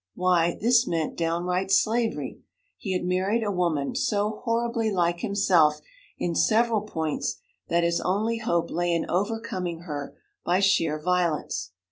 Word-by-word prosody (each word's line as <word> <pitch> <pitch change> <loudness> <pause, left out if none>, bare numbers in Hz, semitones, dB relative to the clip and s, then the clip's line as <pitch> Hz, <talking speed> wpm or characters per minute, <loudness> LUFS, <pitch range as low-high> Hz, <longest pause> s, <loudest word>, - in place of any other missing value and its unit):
Why, 175 -2 +2
this 240 +2 +4
meant 165 -2 -1
downright 175 +3 -1
slavery! 225 +3 +1 0.4
He 195 -4 -3
had 180 -1 -1
married 190 +5 +1
a 205 - -1
woman 170 -7 0
so 210 +1 -1
horribly 230 -1 0
like 175 -3 +1
himself 175 -7 +3 0.4
in 170 - -1
several 225 +4 +2
points 160 -7 -3 0.3
that 170 0 +1
his 170 0 +1
only 220 +5 0
hope 170 -7 0
lay 175 0 0
in 165 - -1
overcoming 185 -3 -2
her 145 -5 -6 0.3
by 180 +2 +2
sheer 165 -6 +2
violence. 170 - -1
180 Hz, 140 wpm, -26 LUFS, 170-215 Hz, 0.4 s, this